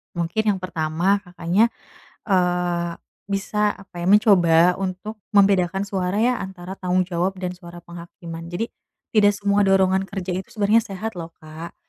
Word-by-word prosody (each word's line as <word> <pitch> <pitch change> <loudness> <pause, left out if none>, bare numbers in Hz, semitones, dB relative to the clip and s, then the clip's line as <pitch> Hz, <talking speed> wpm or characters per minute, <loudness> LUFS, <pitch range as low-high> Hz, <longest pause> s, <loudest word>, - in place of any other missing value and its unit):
mungkin 175 +6 -1
yang - - -7
pertama 175 +3 0
Kakaknya, 180 +3 +1 0.6
eee, 175 -2 +1 0.3
bisa 205 +1 0
apa 190 -3 -13
ya 175 - -3
mencoba 180 -4 +5
untuk 195 +3 -4 0.2
membedakan 195 -2 +4
suara 190 -2 -2
ya 245 0 +2
antara 190 -1 -7
tanggung 185 0 +1
jawab 180 +1 -1
dan 180 - -1
suara 175 0 -11
penghakiman 170 -1 -9
jadi, 175 +7 -4 0.4
tidak 205 -2 +4
semua 200 0 +1
dorongan 190 0 +3
kerja 190 -2 -5
itu 185 +1 -3
sebenarnya 215 +2 +3
sehat 210 0 -5
loh 165 0 -7
Kak, 155 +2 -9
185 Hz, 145 wpm, -22 LUFS, 175-200 Hz, 0.6 s, mencoba